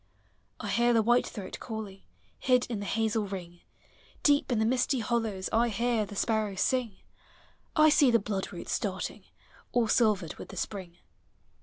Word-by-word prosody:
I - - -5
hear 240 +1 +3
the 225 -1 +4
whitethroat 235 -3 0
calling, 215 -4 -6 0.4
Did 250 -1 +4
in 220 - -2
the 200 - -5
hazel 220 -1 0
ring; 175 -3 -7 0.6
Deep 285 -2 +3
in 240 - +2
the 220 - +2
misty 255 +2 +1
hollows 220 -4 -1
I 235 +2 +3
hear 230 0 0
the 205 - -9
sparrows 215 -2 0
sing; 250 -6 0 0.8
I 310 -1 +6
see 295 -3 +5
the 235 - +5
bloodroot 195 -2 -4
starting, - - -3 0.5
All 240 -2 +3
silvered 210 -8 +2
with - - -9
the - - -9
spring. 185 -4 -5
220 Hz, 155 wpm, -29 LUFS, 200-240 Hz, 0.8 s, I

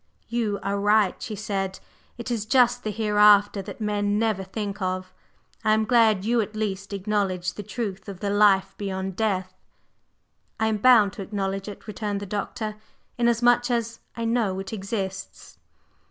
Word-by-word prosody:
"You 225 -4 -1
are 200 +1 -1
right," 205 -1 +2
she 215 - -5
said. 195 -2 -3 0.4
"It 235 +1 -5
is 220 -3 -2
just 245 0 +3
the 215 - -2
Hereafter 210 -1 +4
that 195 - -9
men 205 -1 0
never 215 -3 0
think 200 +1 -5
of. 185 0 -3 0.5
I 215 - +4
am 220 0 +2
glad 220 -5 +3
you, 235 +1 +2
at 215 0 -5
least, 200 -2 -3
acknowledge 195 -3 -1
the - - -6
truth 205 -1 -5
of 190 -2 -8
the 200 0 -2
life 205 -2 +4
beyond 190 -2 -3
death." 190 -3 -1 1.1
"I 220 - +2
am 215 - 0
bound 215 -3 +5
to 215 - -7
acknowledge 195 0 -3
it," 205 - -9
returned 210 -1 -3
the 205 - -6
Doctor; 210 +2 -4 0.4
"inasmuch 240 +1 +3
as 230 -1 -1 0.2
I 230 - -2
know 225 -5 +1
it 195 +3 -6
exists." 195 -2 -5
210 Hz, 165 wpm, -25 LUFS, 195-220 Hz, 1.1 s, bound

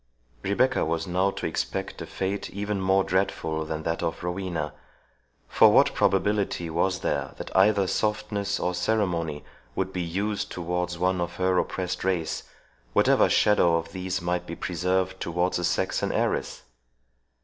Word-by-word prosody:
Rebecca 125 - +2
was 80 +1 -1
now 95 +2 +1
to - - -5
expect - - -3
a - - -6
fate 95 +1 -3
even 100 0 -3
more 95 +1 +3
dreadful 90 -4 -1
than 80 0 -4
that 80 +1 -1
of 80 - -3
Rowena; 90 -4 -3 0.7
for - - +6
what - - +5
probability 95 -3 +1
was 90 +3 0
there - - -2
that - - -8
either 100 +1 +5
softness 105 0 -1
or 90 - 0
ceremony 90 -6 -1 0.3
would 95 0 -2
be 90 - -2
used 100 +5 -2
towards 90 0 -2
one 90 +1 +1
of 85 - -3
her 95 0 +1
oppressed 90 -1 -2
race, 90 -4 0 0.5
whatever - - +4
shadow 90 -5 +4
of 85 0 -5
these 95 -1 -3
might 90 0 -1
be 85 - -5
preserved 95 +2 -1
towards 90 +2 0
a - - -3
Saxon 90 +2 0
heiress? - - -1
90 Hz, 150 wpm, -26 LUFS, 85-95 Hz, 0.7 s, for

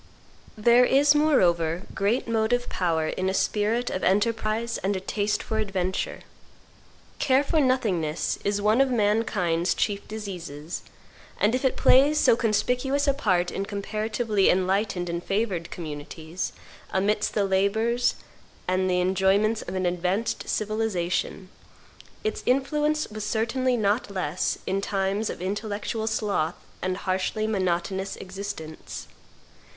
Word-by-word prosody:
There 235 +3 +5
is 280 +3 +5
moreover 180 - +2
great 210 +6 0
motive 230 +2 +1
power 165 -3 0
in 185 0 -1
a 190 - -1
spirit 220 +5 0
of 185 - -3
enterprise 220 +3 +1
and 195 +1 -1
a - - -1
taste 205 +2 -1
for 220 - -2
adventure. 190 -3 -2 1.0
Care 265 0 +3
for 315 +2 +1
nothingness 195 - 0
is 205 0 0
one 215 +5 +4
of 270 - +3
man 215 -2 +2
kind's 175 -3 0
chief 200 -1 -1
diseases, 175 -8 -6 0.6
and 210 +3 +3
if 255 - 0
it 265 - +1
plays 285 +4 +5
so 230 - +5
conspicuous 250 +5 +1
a 280 - +4
part 185 -10 +1
in 195 - -2
comparatively 215 +1 0
enlightened 185 0 +1
and 170 0 -3
favored 195 -5 -1
communities, 160 +2 -6 0.4
amidst 205 +2 0
the 205 -2 +2
labors 220 +5 +1 0.5
and 185 +1 +1
the 180 0 +2
enjoyments 195 +4 +2
of - - -6
an 185 -1 -1
advanced 180 +5 -1
civilization, 205 -4 -1 0.8
its 435 - -2
influence 300 +4 +1
was 215 0 -5
certainly 235 +4 0
not 210 +2 +1
less 185 -3 -1
in 195 +1 0
times 200 +2 -1
of 175 - -6
intellectual 210 +2 -3
sloth 200 -7 0 0.3
and 185 0 -1
harshly 190 +3 0
monotonous 190 -1 -1
existence. 190 -5 -7
205 Hz, 130 wpm, -26 LUFS, 185-230 Hz, 1.0 s, There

